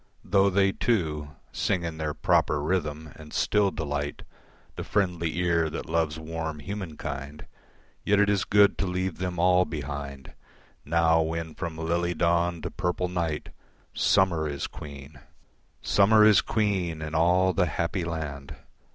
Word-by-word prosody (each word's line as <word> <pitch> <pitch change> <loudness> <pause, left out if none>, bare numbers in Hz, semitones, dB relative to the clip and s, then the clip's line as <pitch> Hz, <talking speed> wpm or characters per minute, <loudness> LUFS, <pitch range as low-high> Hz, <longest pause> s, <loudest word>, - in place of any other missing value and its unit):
Though 100 0 +4
they 95 0 +3
too 75 - -1 0.2
Sing 95 -4 -1
in 80 -1 -5
their 75 -1 -2
proper 75 - +2
rhythm, 75 -2 -2
and 75 -1 -12
still 105 -2 +2
delight 75 -4 -4 0.5
The - - -5
friendly 90 -5 -1
ear 85 -2 +1
that 80 - -5
loves 80 -1 0
warm 80 0 -5
human 90 -1 -6
kind, 70 +1 -6 0.6
Yet 100 0 +3
it 105 - +4
is 100 -2 +2
good 100 -1 +4
to 95 - 0
leave 90 -1 -2
them 90 -1 -3
all 90 +1 +4
behind, 70 -4 -6 0.5
Now 80 +1 +3
when 80 0 -3
from 85 -3 -5
lily 85 +2 -1
dawn 85 0 +1
to - - -4
purple 90 0 -2
night 85 -4 -2 0.4
Summer 85 -5 +2
is 70 -1 -3
queen, 70 -2 -10 0.6
Summer 105 +2 +5
is 105 -2 +6
queen 95 -7 -1
in 75 0 -6
all 90 +3 +3
the 90 -2 +2
happy 85 +4 -2
land. 75 -4 -5
85 Hz, 150 wpm, -27 LUFS, 75-95 Hz, 0.6 s, is